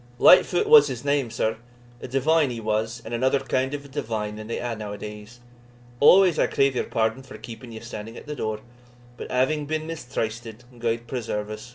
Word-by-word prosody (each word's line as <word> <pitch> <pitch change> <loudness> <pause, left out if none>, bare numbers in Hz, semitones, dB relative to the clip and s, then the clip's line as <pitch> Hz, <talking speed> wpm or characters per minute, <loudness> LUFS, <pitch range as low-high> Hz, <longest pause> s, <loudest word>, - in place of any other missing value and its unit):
"Lightfoot 185 - +6
was 455 0 +8
his - - -6
name, 140 -3 +1
sir; 110 0 -1 0.4
a - - -6
divine 145 +3 +2
he 120 -2 -5
was, 110 +2 -2
and 115 - -6
another 130 +3 +2
kind 130 0 -1
of 140 0 -8
a - - -10
divine 110 -7 -4
than 110 0 -8
they 115 - -3
hae 120 -1 -3
now 105 -2 -6
adays. 105 +3 -9 0.6
Always, 180 +2 +6
I - - +3
crave 135 -1 +2
your - - 0
pardon 110 +3 -1
for 130 - -11
keeping 120 +1 -10
ye 110 - -8
standing 115 -1 -8
at - - -11
the 150 0 -5
door, 110 -4 -3 0.5
but - - -8
having 145 +4 0
been 155 0 -2
mistrysted 115 -7 -5 0.2
(gude 115 0 -1
preserve 110 -4 -4
us!) 110 +3 -8
120 Hz, 200 wpm, -24 LUFS, 110-140 Hz, 0.6 s, was